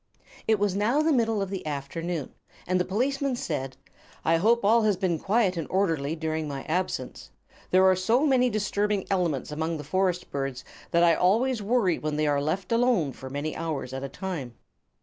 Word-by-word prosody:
It 220 -1 +4
was 200 -2 0
now 235 +9 +2
the 320 0 +3
middle 225 -5 +1
of 195 - -6
the 195 - -4
afternoon, 150 +2 -4 0.3
and 185 +1 +1
the 180 - +1
policeman 270 +6 0
said: 135 - -4 0.5
"I 165 +1 +4
hope 225 +5 +3
all 230 +3 +5
has 210 -3 +2
been 180 -4 0
quiet 200 -2 +1
and 165 - -3
orderly 165 -6 0
during 160 -1 -2
my 140 -2 -5
absence. 180 +3 -3 0.4
There 185 +1 +5
are 190 0 +6
so 225 +10 +2
many 255 -3 +3
disturbing 205 -2 0
elements 170 -8 0
among 160 +2 -2
the 150 - -7
forest 180 +3 -1
birds 135 -2 -3 0.2
that 170 0 +3
I 170 -1 +6
always 225 +8 +2
worry 205 -5 +1
when 155 -1 -2
they 155 0 +1
are 145 -1 +2
left 180 +7 -2
alone 230 - +2
for 130 0 -9
many 145 +3 -3
hours 155 -6 -4
at 135 - -4
a 140 - -4
time." 155 -12 -5
180 Hz, 190 wpm, -27 LUFS, 155-210 Hz, 0.5 s, are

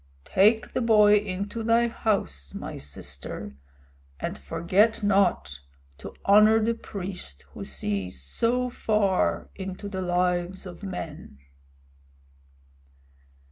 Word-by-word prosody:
Take 215 +4 +3
the - - 0
boy 210 -3 +6
into 200 +2 -3
thy 230 +1 +3
house, 75 - -2
my - - -6
sister, 70 -1 -8 0.6
and - - -3
forget 185 - +1
not 190 - +2 0.4
to - - -9
honor 215 +2 +6
the 225 +1 +1
priest 185 - -7
who - - -8
sees 90 +5 -4
so 235 - 0
far 210 -5 +1
into 190 +1 -6
the 190 -2 -4
lives 180 +1 0
of 180 -2 -9
men." 165 - -7
190 Hz, 105 wpm, -26 LUFS, 150-215 Hz, 0.6 s, boy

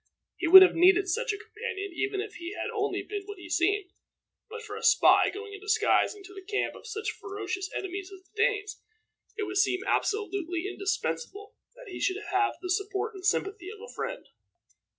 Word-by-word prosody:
He - - -1
would 380 +3 +12
have 370 - +4
needed 370 +3 +5
such 480 +6 0
a 410 - -4
companion 400 -3 -6
even 400 +2 -1
if 425 0 -7
he 345 +2 -6
had - - -4
been - - -5
only 425 -2 -2 0.2
what 410 -1 -7
he 355 -1 -11
seemed; 380 +2 +1 0.6
but 460 +1 -8
for - - -7
a - - -7
spy, - - +5
going 410 0 -8
in 405 - -8
disguise 420 +1 +2
into 395 -1 -13
the 390 - -9
camp 410 +2 -2
of - - -12
such 430 -1 -3
ferocious 390 -2 -5
enemies 385 +1 -5
as 380 -1 -12
the 385 - -35
Danes, 425 -2 0 0.6
it 425 - -1
would 390 -1 -3
seem 385 -1 +2
absolutely 390 -4 -1
indispensable 400 +1 -3 0.2
that - - -12
he - - -6
should 375 0 0
have 400 +2 +2
the 365 - -2
support 400 +3 -1
and 380 -2 -10
sympathy 395 -1 -1
of 425 0 -10
a 475 +3 -11
friend. - - -5
400 Hz, 195 wpm, -28 LUFS, 380-425 Hz, 0.6 s, would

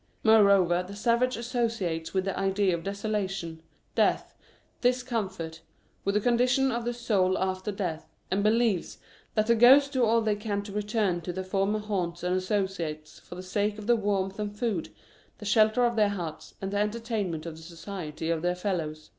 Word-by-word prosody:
Moreover, 200 -5 +5
the 190 +2 -9
savage 235 +3 +1
associates 230 -9 -2
the 190 0 -1
idea 195 -1 +1
of 165 - -6
desola 200 0 -2
tion, 165 -4 -6 0.3
death, - - +1 0.5
discomfort, 225 -10 -1 0.4
with 200 +1 0
the 210 - +3
condition 250 +3 +3
of 235 0 -2
the 240 - 0
soul 195 -6 +1
after 190 +2 -2
death, 180 -5 -4 0.2
and 190 +2 +1
believes 215 -3 +1 0.4
that 215 -1 +3
the 235 - +4
ghosts 265 +5 +7
do 260 -3 +1
all 230 0 +4
they 215 -1 +1
can 205 -1 -3
to 205 - -9
return 205 -3 0
to 180 - -4
their 190 +2 -4
former 195 +2 0
haunts 185 -5 -3
and 180 +1 +1
associates 185 -6 -2
for - - -11
the 180 - -7
sake 205 +3 -1
of 210 - -8
the 240 +2 +4
warmth 200 -2 -1
and 205 0 -4
food, 210 - -1 0.5
the 210 - -10
shelter 215 +3 +4
of 235 0 +1
the 210 -2 +3
huts, 175 -6 -6
and 195 0 -4
the 200 - -1
entertainment 210 -6 -2
of 165 -2 -6
the 160 - -12
society 165 -1 -5
of 165 -1 -1
their 180 +1 0
fellows. 165 -5 -3
200 Hz, 180 wpm, -28 LUFS, 180-220 Hz, 0.5 s, ghosts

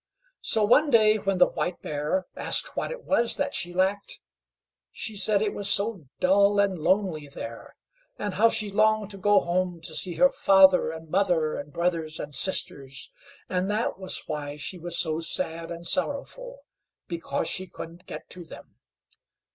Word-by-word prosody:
So 215 -1 +3
one 290 +8 +4
day, 215 -4 +5
when 195 -1 -1
the 180 - +7
White 175 - -3
Bear 150 +5 -2
asked - - +1
what - - -2
it - - -7
was 235 -5 +3
that 285 0 -1
she 175 - -2
lacked, 190 +3 -1 0.7
she 220 -2 -6
said 205 0 +3
it 210 - -1
was 205 0 -2
so 200 -7 0
dull 200 +2 +4
and 200 -2 +2
lonely 175 -3 0
there, 115 -4 -9 0.4
and 205 -2 -3
how 225 +5 +4
she 210 -2 +2
longed 215 0 +2
to 195 - -7
go 205 +1 +4
home 175 0 -1
to 160 - -5
see 175 +1 -2
her 270 - +5
father 190 -1 +5
and 160 -1 -9
mother 175 -5 +1
and 145 +1 -6
brothers 165 -1 -2
and 145 - -6
sisters, 140 -4 -1 0.4
and 185 +1 -1
that 210 -2 -1
was 185 -1 -1
why 145 -1 -5
she 175 +5 -5
was 170 0 -3
so 160 -1 0
sad 165 0 -3
and 170 0 -7
sorrowful, - - -3 0.5
because 170 -1 -3
she 185 0 -2
couldn't 170 +1 -10
get - - -8
to 180 - -7
them. 160 - -14
185 Hz, 170 wpm, -26 LUFS, 165-205 Hz, 0.7 s, the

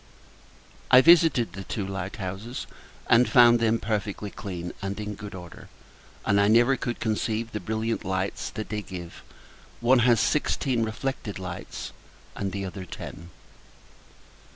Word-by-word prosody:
I 125 - +9
visited 160 -7 +5
the 100 - -7
two 100 +1 -3
light 95 0 -5
houses, 100 +5 -5 0.4
and 120 +1 +5
found 120 -2 +7
them 115 0 +2
perfectly 105 -2 -3
clean, 90 -4 -6
and 100 +1 -4
in 105 0 -4
good 105 -1 -8
order: 90 -2 -11 0.6
and 100 0 +3
I 100 - +4
never 120 +5 +5
could 120 -1 -4
conceive 110 0 -1
the 105 - -3
brilliant 110 +3 -2
light 95 +1 -2
that 110 - -5
they 105 -1 -2
give; 90 -4 -9 0.6
one 120 +2 +4
has 120 -1 +4
sixteen 130 -1 +1
reflected 110 -1 -3
lights, 90 -1 -6 0.4
and 100 -1 -3
the 100 0 -3
other 95 0 -6
ten. 85 -1 -9
105 Hz, 145 wpm, -26 LUFS, 95-120 Hz, 0.6 s, I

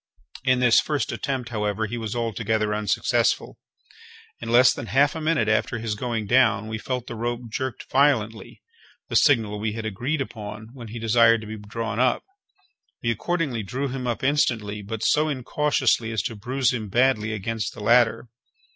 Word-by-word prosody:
In 130 -1 +2
this 120 -2 +6
first 150 -2 -1
attempt, 130 -4 -3
however, 105 -1 -1
he 110 +3 -5
was 110 0 -4
altogether 110 -2 -1
unsuccessful. 105 -1 0 0.8
In 115 - -6
less 120 +1 +6
than 115 - -7
half 140 +4 +3
a 160 - -5
minute 155 -7 +1
after 110 +2 +1
his 110 -1 -3
going 115 0 -3
down 110 -2 +3
we 110 0 -4
felt 125 +1 -3
the 120 - -7
rope 120 +1 -3
jerked 130 0 -4
violently 125 -6 +1 0.5
(the - - -3
signal 110 -8 +3
we 105 0 -2
had 110 0 -5
agreed 120 +9 -2
upon 110 -4 -6
when 120 -4 -9
he 110 +2 -7
desired 115 0 +4
to - - -8
be 110 +1 -7
drawn 110 +1 -4
up). 125 -1 +2 0.8
We 115 - +2
accordingly 140 - -1
drew 130 +7 -3
him 125 -1 -4
up 120 +1 -2
instantly, 115 -7 +1
but 110 +2 -5
so 155 +1 +3
incautiously 130 -3 0
as 110 -5 -1
to 115 - -4
bruise 125 +5 0
him 110 -4 -4
badly 120 -1 +2
against 110 0 -3
the - - -9
ladder. 120 +1 +3
115 Hz, 175 wpm, -24 LUFS, 110-130 Hz, 0.8 s, this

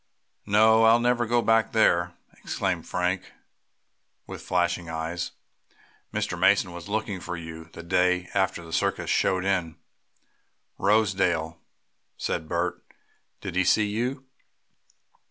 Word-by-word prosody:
"No, 110 +2 +5
I'll 115 +1 +6
never 120 0 +1
go 120 +1 +2
back 115 +1 +2
there!" 85 -5 +3 0.2
exclaimed - - -2
Frank, 90 +1 -2 0.9
with - - -8
flashing 85 -1 -1
eyes. 80 +2 -4 0.8
"Mr. - - -2
Mason 90 - +3
was 85 +2 -9
looking 105 -2 -2
for 90 0 -5
you, 80 -1 -8
the 80 +1 -11
day 90 +1 +1
after 95 -3 0
the 80 - -10
circus - - 0
showed 95 0 +1
in 90 -4 0 1.0
Rosedale," 95 -6 +1 0.6
said 80 - -3
Bert. 85 +1 -2 0.6
"Did - - -5
he 95 +1 +2
see 105 +3 +3
you?" 125 +5 -3
90 Hz, 120 wpm, -26 LUFS, 85-110 Hz, 1.0 s, I'll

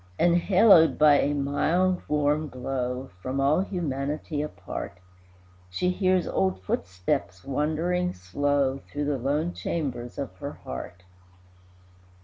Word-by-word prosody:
Enhaloed 175 +1 +5
by 150 -1 +6
a 145 - +1
mild, 170 +6 +1
warm 150 +1 +1
glow, 125 0 -4
From 130 +4 -3
all 140 +4 +3
humanity 150 -5 -2
apart, 150 -10 -6 0.7
She 180 - 0
hears 185 -1 +2
old 95 0 0
footsteps 90 0 -2
wandering 160 +6 -1
slow 135 +9 0
Through 145 +1 -5
the 145 -2 -1
lone 150 +7 0
chambers 125 -7 -4
of 135 -9 -5
her - - -6
heart. 90 +8 -8
145 Hz, 115 wpm, -26 LUFS, 130-165 Hz, 0.7 s, by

